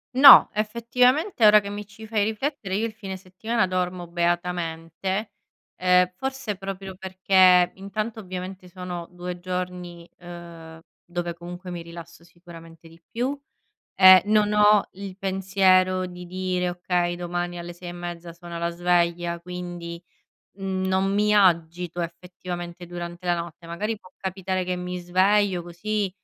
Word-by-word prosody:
No, 270 0 +10
effettivamente 245 - +2
ora 210 0 +8
che 200 -1 -7
mi 205 +1 -6
ci 210 +2 -13
fai 215 -2 +1
riflettere 220 -1 -3
io 220 +3 0
il 220 - -10
fine 195 -3 -7
settimana 190 +4 -2
dormo 180 -1 -2
beatamente, 175 +2 -2 0.4
ehm, 180 0 +4
forse 265 -2 -4
proprio 195 0 -7
perché 185 -1 +4
intanto 215 +4 -4
ovviamente 185 -1 -7
sono 180 -1 -6
2 180 0 -6
giorni, 180 -1 -5
ehm, 170 -2 -11 0.2
dove 175 -1 -4
comunque 175 +2 -9
mi 175 -1 -6
rilasso 170 0 -11
sicuramente 170 -1 -14
di 165 0 -17
più 260 +5 -2 0.6
e 185 -1 +9
non 210 0 +2
ho 210 -1 +5
il 195 0 -8
pensiero 190 -1 +2
di 180 0 -9
dire: 180 0 -2
"Okay 175 0 -1
domani 175 0 -3
alle 175 0 -7
6 175 0 -8
e - - -7
mezza 175 -1 -7
suona 170 0 -9
la 170 0 -1
sveglia". 170 0 0
Quindi 175 -1 -7 0.5
non 190 0 -1
mi 210 +1 +2
agito 175 -2 +2
effettivamente 175 0 -7
durante 175 +1 -7
la 175 - +3
notte. 170 0 -7
Magari 210 +6 -3
può 185 - -18
capitare 190 -1 -3
che 180 0 -2
mi 180 0 -5
sveglio 185 +2 +2
così, 200 +4 -2
180 Hz, 140 wpm, -24 LUFS, 175-195 Hz, 0.6 s, No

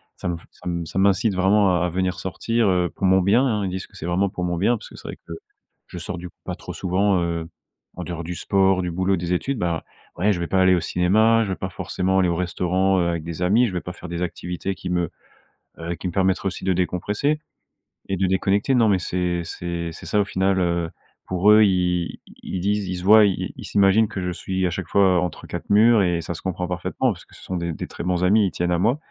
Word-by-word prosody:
ça - - -5
m 85 -1 -1
ça - - -12 0.2
ça 80 - -7
m'incite 100 +2 +3
vraiment 95 -1 +3
à - - +2
à - - 0
venir 90 +1 -1
sortir, 115 +4 -1
heu, 90 -2 +2
pour - - -2
mon 95 0 +5
bien, 105 +8 +3
hein. 110 -5 0
Ils - - -2
disent 95 +1 -5
que - - -23
c'est 85 -3 -6
vraiment 95 +3 +1
pour 90 -2 -5
mon 90 -1 -1
bien 105 +7 +2
parce 110 - -10
que - - -14
c'est - - -11
vrai - - -6
que 85 - -6 0.5
je - - -9
sors 85 +1 -5
du 90 +1 -8
coup - - -29
pas - - -3
trop - - -9
souvent, 95 +1 +1
heu, 85 -1 -3 0.5
en 90 - -5
dehors 85 -1 -5
du 90 +2 -5
sport, 95 0 +2
du 90 - -2
boulot, 95 +3 +1
des 85 +1 -2
études. 130 +9 -1
Bah, 85 -5 -1 0.3
ouais, 100 +5 +2
je 90 - -1
vais 85 - -2
pas 95 +1 +2
aller 95 0 +5
au - - +1
cinéma, 110 +7 +3
je 105 - -4
vais 95 - -1
pas 95 - -3
forcément 95 0 -1
aller 90 -2 +3
au 85 - 0
restaurant, 90 +2 +1
heu, 85 - +1
avec 85 -2 -2
des 85 +1 -6
amis, 105 +8 +4
je 100 - -5
vais 90 - -2
pas 90 - -6
faire 90 - -9
des 85 0 -4
activités 90 +2 -4
qui 90 - -7
me, 90 -2 0 0.7
heu, 85 +1 -4
qui 90 - -5
me - - -3
permettraient 95 +1 +1
aussi 95 - -5
de 95 - +2
décompresser 105 - -1 0.7
et 95 - -1
de 95 +1 0
déconnecter. 100 +6 +1
Non, 115 -3 +4
mais 100 -3 +3
c'est 90 0 -1
c'est 85 0 -4
c'est 80 - -11
ça 105 - +1
au - - 0
final, 95 -1 +1
heu. 85 -2 0 0.4
Pour 95 +3 +3
eux, 110 0 +7
ils 90 -3 0 0.2
ils 95 - -4
disent, 100 +1 0
ils 90 - -3
se 90 - -6
voient, 105 +2 +7
ils 100 -2 -1
ils - - -8
s'imaginent 100 +2 +4
que 95 - -5
je 90 0 -2
suis 95 +2 -2
à - - +2
chaque 90 0 -5
fois 95 -2 +4
entre 90 -2 -4
4 - - -6
murs 110 +2 +5
et 85 -2 0
ça 85 - -5
se 85 - -8
comprend 90 -1 -3
parfaitement 90 +8 -1
parce 90 -4 -9
que - - -19
ce - - -14
sont 95 - -4
des 85 -1 -3
des - - -6
très - - -8
bons 90 0 0
amis 105 +4 +4
et - - +3
ils - - -4
tiennent 90 0 -1
à 85 - +1
moi. 120 +9 +2
95 Hz, 265 wpm, -23 LUFS, 90-100 Hz, 0.7 s, eux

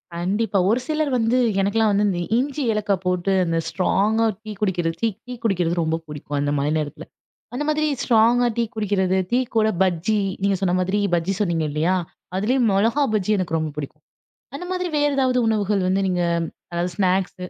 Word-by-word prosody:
கண்டிப்பா. 200 +5 0
ஒரு 230 +4 +3
சிலர் 310 -2 0
வந்து 230 +1 +2 0.2
எனக்கெல்லாம் 215 +2 +2
வந்து 205 +1 +2
இந்த 180 -3 -1 0.2
இஞ்சி, 280 +2 -2
ஏலக்காய் 205 -3 -1
போட்டு 180 +1 0
அந்த 165 -1 0
ஸ்ட்ராங்கா 210 +4 +1 0.2
டீ 215 - -7
குடிக்கிறது 175 -5 0
தீ 230 - +2 0.2
டீ 250 - -5
குடிக்கிறது 180 -6 +1
ரொம்ப 160 0 0
பிடிக்கும் 145 -1 -5
அந்த 145 0 0
மாரி 140 +2 0
நேரத்தில 150 -1 -5 0.5
அந்த 265 +4 -2
மாதிரி 305 0 +1
ஸ்ட்ராங்கா 240 +1 +4
டீ 235 - +2
குடிக்கிறது, 195 -3 0
டீ 245 - +3 0.2
கூட 220 -1 +4
பஜ்ஜி, 190 +3 +1 0.2
நீங்க 200 0 +2
சொன்ன 180 -2 +1
மாதிரி 190 +3 0 0.2
பஜ்ஜி 170 +3 0
சொன்னீங்க 170 -6 0
இல்லையா? 160 +5 +1 0.4
அதுலேயம் 235 +5 +2
மொளகா 225 +9 +2
பஜ்ஜி 210 -1 0
எனக்கு 175 -3 -1
ரொம்ப 155 -1 -2
பிடிக்கும். 150 +1 -7 0.5
அந்த 360 - -6
மாதிரி 365 -1 -2
வேற 290 0 +3
ஏதாவது 255 -2 +2
உணவுகள் 210 -2 +1
வந்து 190 +1 +1
நீங்க 180 -1 0 0.5
அதாவது 175 +1 -2
ஸ்நாக்ஸ் 185 0 +1
195 Hz, 175 wpm, -22 LUFS, 175-225 Hz, 0.5 s, ஸ்ட்ராங்கா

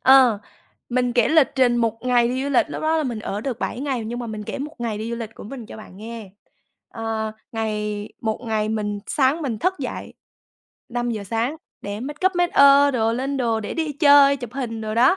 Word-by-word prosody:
Ờ, 260 -5 +6 0.5
mình 250 0 +1
kể 240 -2 +3
lịch 315 -3 +5
trình 250 -3 +3
một 230 -1 0
ngày 245 -1 +3
đi 260 +2 -1
du - - -1
lịch, 270 - +3
lúc - - -5
đó 320 +1 +2
là 315 - +1
mình 245 -6 -3
ở 205 -1 -4
được 245 0 -3
7 245 - -3
ngày 265 -5 -2
nhưng 235 +2 -4
mà 240 - -4
mình 215 -1 -5
kể - - -5
một 300 +3 -5
ngày 225 -3 -2
đi 225 +2 -4
du 235 - -2
lịch 225 -1 -6
của - - -10
mình 240 +1 -8
cho - - -10
bạn 215 -3 -12
nghe. 225 -1 -8 0.6
Ờ, 225 -1 -3 0.2
ngày 210 -2 -2
một 220 -1 -2
ngày 215 -1 0
mình 210 -1 -2
sáng 285 +4 +2
mình 235 -6 -2
thức 370 - +1
dậy - - -5 0.7
5:00 240 -3 -2
sáng 230 +8 -1 0.3
để 205 +1 -5
make 290 +7 -2
up, 375 -1 +1
make 350 0 +2
ơ 280 0 +7
đồ, 225 -4 +1
lên 265 +4 -2
đồ 230 -4 0
để 205 - -5
đi 320 -2 -1
chơi, 285 -1 +6
chụp 245 -4 -8
hình 235 -4 -4
đồ 215 0 -3
đó. 250 +10 +5
240 Hz, 230 wpm, -22 LUFS, 220-275 Hz, 0.7 s, ơ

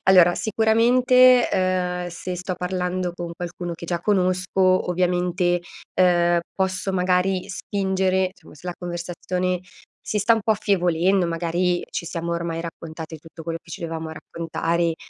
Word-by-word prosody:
allora 180 -2 +6
sicuramente, 245 +3 +4
uhm, 180 -1 0
se 175 +1 -5
sto 180 +1 -3
parlando 180 0 -2
con 175 -1 -5
qualcuno 175 0 -5
che 170 - -9
già 175 0 -1
conosco, 185 -1 +2
ovviamente, 180 0 +1 0.4
uhm, 175 -1 +4
posso 190 0 -1
magari 180 0 +1
spingere, 190 -2 0
insomma - - -17
se 165 +4 -13
la 175 - -3
conversazione 180 +1 -3 0.4
si 210 - -2
sta 210 +3 +4
un 225 - -1
po' 220 - +3
affievolendo, 185 -2 +2
magari 175 +1 0
ci 170 - -4
siamo 170 0 -3
ormai 170 -1 -2
raccontate 160 -1 -7
tutto 165 +1 -12
quello 165 0 -4
che 170 - -17
ci - - -7
dovevamo 160 -1 -4
raccontare, 165 +1 -2
180 Hz, 145 wpm, -23 LUFS, 170-190 Hz, 0.4 s, allora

